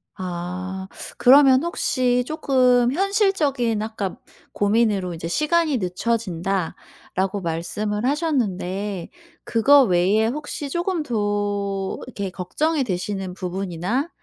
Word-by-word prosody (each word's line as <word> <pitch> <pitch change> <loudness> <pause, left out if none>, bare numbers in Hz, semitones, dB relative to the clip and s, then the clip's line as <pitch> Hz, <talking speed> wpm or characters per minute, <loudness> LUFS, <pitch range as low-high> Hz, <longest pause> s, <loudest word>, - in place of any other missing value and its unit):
아. 185 +1 -5 0.3
그러면 265 +1 +6
혹시 250 -7 +1
쪼끔 250 -5 +3
현실적인 310 - +1
아까 215 -3 -4 0.4
고민으로 205 -3 +1
이제 165 0 -5
"시간이 305 - +1
늦춰진다."라고 190 -1 -2
말씀을 205 +6 -2
하셨는데 205 - -1 0.3
그거 275 +5 +5
외에 195 +2 +3
혹시 290 +2 -4
쪼금 345 0 -1
더 205 -4 -1
이렇게 200 -6 -5
걱정이 280 - -1
되시는 190 -2 -3
부분이나 190 - -2
210 Hz, 245 characters per minute, -22 LUFS, 190-270 Hz, 0.4 s, 그러면